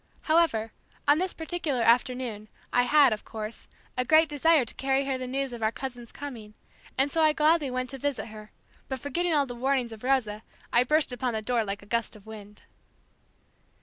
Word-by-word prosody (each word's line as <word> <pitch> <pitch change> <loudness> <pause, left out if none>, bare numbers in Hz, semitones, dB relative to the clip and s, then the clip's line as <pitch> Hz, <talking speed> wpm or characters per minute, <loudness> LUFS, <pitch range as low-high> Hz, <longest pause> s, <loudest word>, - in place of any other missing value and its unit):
However, 310 -10 +2 0.4
on 290 +2 +5
this 370 0 0
particular 320 -6 -2
afternoon, 235 -2 +1 0.3
I 245 0 +4
had, 290 -5 +6
of 210 - -6
course, 220 0 -7 0.3
a 250 - +1
great 315 +5 +5
desire 295 -1 +3
to - - -6
carry 270 0 0
her 270 -1 -1
the 255 -1 -4
news 270 0 -2
of 235 - -7
our 220 0 +2
cousin's 245 -2 -7
coming, 230 -7 -8 0.4
and 275 +2 +2
so 325 - +1
I 310 -1 +5
gladly 305 -1 +3
went 255 +1 -3
to 270 - -7
visit 280 -4 -2
her; 215 0 -11 0.4
but 265 - -2
forgetting 325 +6 -1
all 285 -1 +3
the 245 - -7
warnings 255 -1 0
of 220 0 -10
Rosa 245 -5 +1 0.3
I 240 - +5
burst 300 -1 +2
open 245 0 -2
the 220 0 -3
door 240 0 +1
like 200 0 -5
a - - -14
gust 230 +1 -2
of 210 -1 -15
wind. 210 -1 -11
255 Hz, 200 wpm, -27 LUFS, 225-285 Hz, 0.4 s, had